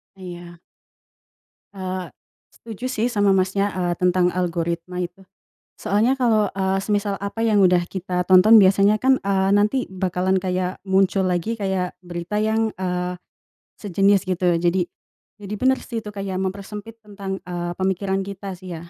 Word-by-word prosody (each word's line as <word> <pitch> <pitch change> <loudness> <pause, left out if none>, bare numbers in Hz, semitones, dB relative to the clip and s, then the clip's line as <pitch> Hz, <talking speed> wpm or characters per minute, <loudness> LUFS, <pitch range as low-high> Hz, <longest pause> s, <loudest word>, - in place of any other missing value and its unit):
Iya. 175 -2 -10 1.1
Eee, 185 -1 -5 0.4
setuju 230 +1 -9
sih 240 -3 0
sama, 205 -4 +2
Masnya, 195 +2 +1
eee, 175 -2 -1
tentang 180 0 +2
algoritma 175 0 -2
itu. 180 +2 -7 0.5
Soalnya 220 +6 +1
kalau, 220 -5 +2
eee, 190 0 0
semisal 205 -1 0
apa 200 +3 -6
yang 215 -3 +3
udah 180 -1 +5
kita 180 -1 -3
tonton 210 +4 +8
biasanya 200 +2 +4
kan, 265 +1 +4
eee, 195 -1 +1
nanti 215 +6 +1
bakalan 185 0 -1
kayak 185 0 -2
muncul 190 0 +2
lagi 180 +5 -1
kayak 190 -3 -2
berita 175 +3 -5
yang, 220 0 0
eee, 180 -1 -2 0.6
sejenis 200 0 +2
gitu 180 -2 +1
jadi 175 +1 +1 0.5
jadi 205 0 -7
bener 260 +5 +2
sih 230 -2 -5
itu 210 - -8
kayak 195 -2 -4
mempersempit 205 +3 -6
tentang, 200 -3 -6
eee, 175 -1 -4
pemikiran 190 +1 -1
kita 195 -1 -7
sih 185 -1 -8
ya. 170 +1 -9
190 Hz, 145 wpm, -22 LUFS, 180-205 Hz, 1.1 s, tonton